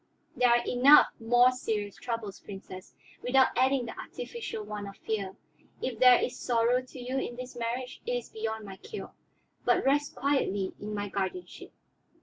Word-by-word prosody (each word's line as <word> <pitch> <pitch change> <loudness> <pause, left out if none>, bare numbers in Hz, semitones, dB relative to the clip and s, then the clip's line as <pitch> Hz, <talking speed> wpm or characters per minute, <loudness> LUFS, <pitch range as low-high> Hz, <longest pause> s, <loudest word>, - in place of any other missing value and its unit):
There 250 0 +4
are 240 0 +3
enough 265 +4 +7
more 245 +2 +5
serious 210 -5 -3
troubles, 230 -5 -5
Princess, 190 -2 -10 0.3
without 260 +1 +3
adding 260 0 +2
the 230 - -7
artificial 470 - -6
one 210 -1 -6
of 195 0 -10
fear. 200 -4 -3 0.4
If 245 -4 -4
there 250 -1 +8
is - - -3
sorrow 240 +1 +2
to 255 +1 -12
you 255 +2 -2
in 245 - -4
this 255 +1 -8
marriage, 245 +2 -4
it - - 0
is 245 -1 -3
beyond 220 0 -4
my 195 -1 -9
cure; 425 - -8 0.5
but - - +2
rest 290 +2 +2
quietly 205 -9 0
in 210 +1 -5
my 205 0 -2
guardianship." 190 -2 -5
240 Hz, 165 wpm, -29 LUFS, 205-255 Hz, 0.5 s, there